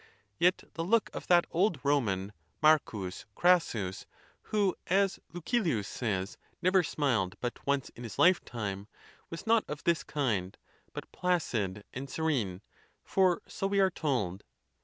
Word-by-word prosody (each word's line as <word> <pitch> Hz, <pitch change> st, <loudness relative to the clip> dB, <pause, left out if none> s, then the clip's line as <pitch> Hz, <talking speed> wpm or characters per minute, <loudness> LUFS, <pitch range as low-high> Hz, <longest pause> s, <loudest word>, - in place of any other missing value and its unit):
Yet 180 Hz, +1 st, +3 dB
the 165 Hz, -, -3 dB
look 220 Hz, +5 st, +2 dB
of -, -, -7 dB
that 175 Hz, -1 st, +5 dB
old 175 Hz, -3 st, +2 dB
Roman, 105 Hz, -9 st, +1 dB, 0.3 s
M. 155 Hz, 0 st, +7 dB, 0.6 s
Crassus, 120 Hz, -, +2 dB, 0.3 s
who, 205 Hz, -4 st, 0 dB
as 195 Hz, +1 st, +2 dB
Lucilius 170 Hz, -, 0 dB
says, 100 Hz, -4 st, -3 dB, 0.2 s
never 185 Hz, +1 st, +4 dB
smiled 125 Hz, -, 0 dB
but 120 Hz, +2 st, -5 dB
once 140 Hz, -1 st, +1 dB
in 120 Hz, -, -13 dB
his 115 Hz, -3 st, -7 dB
lifetime, 105 Hz, -, +1 dB, 0.4 s
was 165 Hz, -, -7 dB
not 225 Hz, 0 st, +4 dB
of 150 Hz, -1 st, -6 dB
this 170 Hz, -4 st, +2 dB
kind, 110 Hz, -13 st, -1 dB, 0.4 s
but -, -, -8 dB
placid 115 Hz, -, -1 dB
and 135 Hz, +2 st, -6 dB
serene, 120 Hz, -, -1 dB, 0.4 s
for 185 Hz, -2 st, +2 dB
so 195 Hz, -, -2 dB
we 200 Hz, 0 st, +1 dB
are 190 Hz, -1 st, +4 dB
told. 120 Hz, -, -2 dB
145 Hz, 135 wpm, -30 LUFS, -, 0.6 s, M